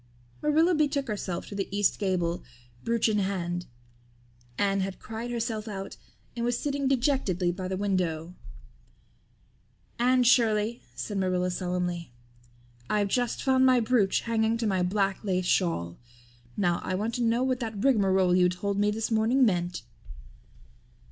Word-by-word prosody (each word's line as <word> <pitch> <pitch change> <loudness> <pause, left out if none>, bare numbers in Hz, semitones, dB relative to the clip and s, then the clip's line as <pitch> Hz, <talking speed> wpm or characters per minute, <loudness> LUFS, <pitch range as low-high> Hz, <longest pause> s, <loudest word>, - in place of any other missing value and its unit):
Marilla 315 +4 +3
betook 290 -3 +1
herself 190 -4 -3
to - - -9
the 200 -1 -2
east 205 0 +1
gable, 180 -4 -1 0.4
brooch 230 -1 +1
in 210 -1 +1
hand. 175 -3 -2 0.9
Anne 195 -1 +1
had 190 0 -3
cried 225 +2 -6
herself 230 -2 -3
out 195 -2 -6 0.4
and 235 - -3
was 240 0 0
sitting 280 -1 -1
dejectedly 240 - +1
by 185 +1 -5
the 190 0 -3
window. 180 -4 -1 1.7
"Anne 250 +1 +4
Shirley," 230 -2 +3
said 195 - -3
Marilla 180 -1 0
solemnly, 180 -3 -3 0.8
"I've 205 -1 +1
just 245 +2 -1
found 260 -1 +4
my 255 -1 +5
brooch 220 -4 +2
hanging 225 0 +1
to 230 - -2
my 190 -3 +1
black 195 +2 0
lace 185 -3 0
shawl. 90 - 0 0.6
Now 175 -4 +1
I 185 - -2
want 215 +4 -2
to - - -2
know 235 +1 +2
what 255 -1 0
that 225 -4 -4
rigmarole 190 -8 +3
you 180 -1 +4
told 200 +2 -2
me 205 0 +3
this 220 +2 -2
morning 230 +4 +3
meant." 180 -4 -1
205 Hz, 150 wpm, -27 LUFS, 185-235 Hz, 1.7 s, my